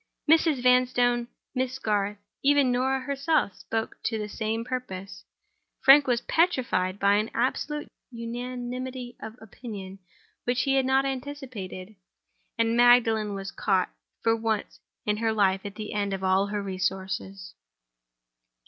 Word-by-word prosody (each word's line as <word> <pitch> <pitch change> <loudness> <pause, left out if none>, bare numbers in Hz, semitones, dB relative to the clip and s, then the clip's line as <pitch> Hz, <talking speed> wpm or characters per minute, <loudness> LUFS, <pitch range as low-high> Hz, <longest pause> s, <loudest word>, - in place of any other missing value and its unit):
Mrs. 315 -4 +4
Vanstone, 245 -1 +3 0.3
Miss 260 0 -1
Garth, 210 -4 -1 0.2
even 280 -2 +4
Norah 260 +2 +1
herself, 280 - 0
spoke 225 +3 -4
to 225 - 0
the 210 -1 -3
same 220 +2 -3
purpose. 195 -7 -5 0.6
Frank 275 +1 +7
was 240 -2 +2
petrified 255 - +1
by 200 0 +4
an 215 +1 0
absolute 295 +5 -1 0.2
unanimity 245 +1 -5
of 220 0 -8
opinion 200 -4 -9 0.5
which 245 +1 +1
he 275 - +1
had 265 -1 +2
not 265 +1 +3
anticipated; 250 -8 -6 0.6
and 230 0 +2
Magdalen 225 -4 +4
was 195 0 -5
caught, 190 -3 +1 0.3
for 225 0 +4
once 220 -2 -2 0.3
in 210 0 +1
her 225 0 +1
life, 195 -3 +2
at 200 - -6
the 215 -1 -6
end 200 -1 -1
of 190 - -7
all 190 +1 +3
her 205 0 -3
resources. 190 0 -3
230 Hz, 135 wpm, -27 LUFS, 200-255 Hz, 0.6 s, Frank